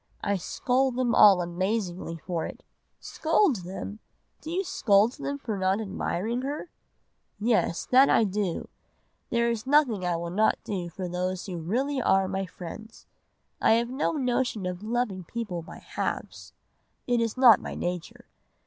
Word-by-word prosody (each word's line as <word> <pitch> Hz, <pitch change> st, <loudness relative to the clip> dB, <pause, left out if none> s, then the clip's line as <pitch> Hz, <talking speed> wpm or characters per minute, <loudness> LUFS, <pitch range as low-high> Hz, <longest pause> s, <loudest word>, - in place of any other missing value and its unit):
I 200 Hz, 0 st, +1 dB
scold 255 Hz, +7 st, 0 dB
them 250 Hz, -2 st, +1 dB
all 195 Hz, -4 st, +7 dB
amazingly 180 Hz, -1 st, -2 dB
for 170 Hz, 0 st, -3 dB
it.' -, -, -11 dB, 0.4 s
"'Scold 320 Hz, -, +1 dB
them! 190 Hz, +3 st, -7 dB, 0.4 s
Do 315 Hz, -, -8 dB
you 365 Hz, +4 st, -1 dB
scold 210 Hz, -, +3 dB
them 280 Hz, 0 st, -3 dB
for 230 Hz, -6 st, -4 dB
not 190 Hz, +2 st, +1 dB
admiring 220 Hz, +2 st, -2 dB
her?' 290 Hz, +5 st, -5 dB, 0.7 s
"'Yes, 215 Hz, -6 st, +1 dB
that 265 Hz, +2 st, +7 dB
I -, -, +5 dB
do. 200 Hz, -3 st, -2 dB, 0.6 s
There 235 Hz, 0 st, +2 dB
is 230 Hz, +2 st, -4 dB
nothing 265 Hz, -9 st, +3 dB
I 175 Hz, -1 st, 0 dB
would 170 Hz, +1 st, -4 dB
not 215 Hz, +3 st, +3 dB
do 180 Hz, -4 st, -4 dB
for 180 Hz, +2 st, -5 dB
those 180 Hz, +1 st, -3 dB
who 180 Hz, -3 st, -5 dB
really 260 Hz, -, -1 dB
are 195 Hz, -4 st, +3 dB
my 190 Hz, 0 st, -2 dB
friends. 220 Hz, +6 st, -10 dB, 0.6 s
I -, -, +5 dB
have 235 Hz, +2 st, +1 dB
no 265 Hz, +5 st, 0 dB
notion 250 Hz, -, -1 dB
of 180 Hz, 0 st, -4 dB
loving 215 Hz, -4 st, -2 dB
people 190 Hz, -2 st, -4 dB
by 165 Hz, -, -11 dB
halves, -, -, -5 dB, 0.5 s
it 245 Hz, -1 st, +1 dB
is 230 Hz, +1 st, -1 dB
not 250 Hz, -4 st, +7 dB
my -, -, -6 dB
nature. 175 Hz, -1 st, -5 dB
210 Hz, 160 wpm, -27 LUFS, 185-245 Hz, 0.7 s, all